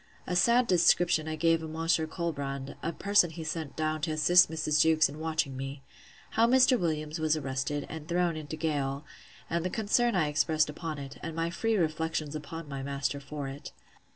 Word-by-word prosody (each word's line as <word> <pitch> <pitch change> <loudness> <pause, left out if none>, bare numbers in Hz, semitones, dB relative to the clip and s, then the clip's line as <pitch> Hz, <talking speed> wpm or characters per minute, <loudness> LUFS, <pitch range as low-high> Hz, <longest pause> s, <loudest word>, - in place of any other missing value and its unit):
A 180 - -2
sad 235 +7 +4
description 175 -4 +3
I 155 - -2
gave 165 +1 +2
of 160 - -6
Monsieur 160 0 0
Colbrand, 140 -5 -4
a 165 - -2
person 200 -1 +3
he 160 0 -7
sent 155 -3 -4
down 155 0 -1
to 155 - -1
assist 175 +3 +5
Mrs. 155 -2 +1
Jewkes 160 -1 +4
in 145 +2 -10
watching 160 -4 -1
me. 135 +1 -6 0.5
How 230 +1 +3
Mr. 255 +1 +5
Williams 155 -2 -2
was 155 0 +2
arrested, 135 +1 -3
and 160 -1 -8
thrown 175 -1 +1
into 155 0 -6
gaol; 145 -3 -2 0.4
and 170 0 -1
the 185 - -1
concern 225 +3 +1
I 160 -5 +2
expressed 150 +1 +1
upon 155 0 -5
it; 140 -1 -8
and 165 -1 -6
my 165 +1 -1
free 225 +6 0
reflections 160 -2 -1
on 160 +1 -7
my 140 -1 -5
master 140 +1 -2
for 140 0 -6
it. 135 +2 -8
155 Hz, 190 wpm, -29 LUFS, 145-170 Hz, 0.5 s, assist